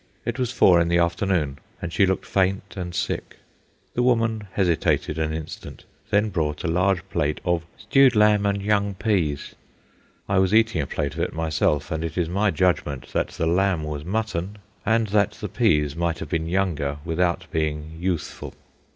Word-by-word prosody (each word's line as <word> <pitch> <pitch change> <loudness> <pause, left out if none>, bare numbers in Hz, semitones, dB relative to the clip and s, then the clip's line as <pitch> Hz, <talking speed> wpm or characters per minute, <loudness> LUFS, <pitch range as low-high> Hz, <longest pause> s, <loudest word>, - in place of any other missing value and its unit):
It 120 +2 -3
was 125 -1 0
four 90 -9 +5
in 85 - +1
the 85 0 +2
afternoon, 85 -4 0 0.2
and 85 -1 -5
she 100 - +4
looked 95 - -1
faint 95 0 0
and 90 -2 -5
sick. - - -3 0.6
The 125 - 0
woman 115 -4 +1
hesitated 85 -4 +1
an 80 0 0
instant, 80 -1 -7 0.2
then 105 +1 +2
brought 75 -5 -2
a - - -1
large 90 +1 +1
plate 75 +1 0
of 85 -2 0
"stewed 135 -3 +4
lamb 105 -1 +4
and 100 0 -1
young 100 -1 +1
peas." 90 - -1 0.7
I 100 -1 +2
was 95 +2 +3
eating 110 -7 +3
a 70 - -3
plate 70 +1 -2
of 80 - -7
it - - -1
myself, 80 -2 0
and 80 0 -2
it 85 0 -4
is 85 -2 +1
my 100 +4 +2
judgment 80 -5 0
that - - +1
the 80 - -3
lamb 90 0 +2
was 75 -1 -4
mutton 100 0 -2 0.3
and 115 0 +3
that 100 -1 +2
the - - -6
peas 75 -1 +1
might 85 0 -1
have - - -7
been 80 -2 -1
younger 85 -6 0
without 85 +1 0
being 80 0 -2
youthful. 90 -3 -3
90 Hz, 180 wpm, -24 LUFS, 80-100 Hz, 0.7 s, four